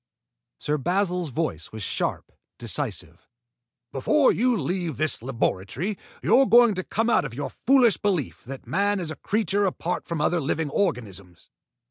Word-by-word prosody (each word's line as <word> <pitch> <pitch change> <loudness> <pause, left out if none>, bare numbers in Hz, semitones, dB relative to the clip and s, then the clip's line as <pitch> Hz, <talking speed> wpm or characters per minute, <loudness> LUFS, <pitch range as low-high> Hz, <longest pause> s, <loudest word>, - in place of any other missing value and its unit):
Sir 150 - -1
Basil's 180 +1 0
voice 120 - -3
was 110 -1 -6
sharp, - - -3 0.3
decisive. - - -4 0.6
"Before 275 - +3
you 245 0 +2
leave 170 0 -2
this 155 -5 +1
laboratory, 125 - -2 0.3
you're 270 0 +5
going 235 -1 +6
to 185 -1 -3
come 225 +5 -1
out 235 - +3
of 130 -5 -6
your 145 +2 -4
foolish 250 -5 +4
belief 185 - -2
that 135 +1 -8
man 205 0 +1
is 165 -3 -3
a - - -5
creature 205 -1 0
apart 180 -1 -3
from 170 -3 -3
other 165 +3 +1
living 150 +1 -1
organisms. 100 - -3
170 Hz, 150 wpm, -25 LUFS, 135-205 Hz, 0.6 s, going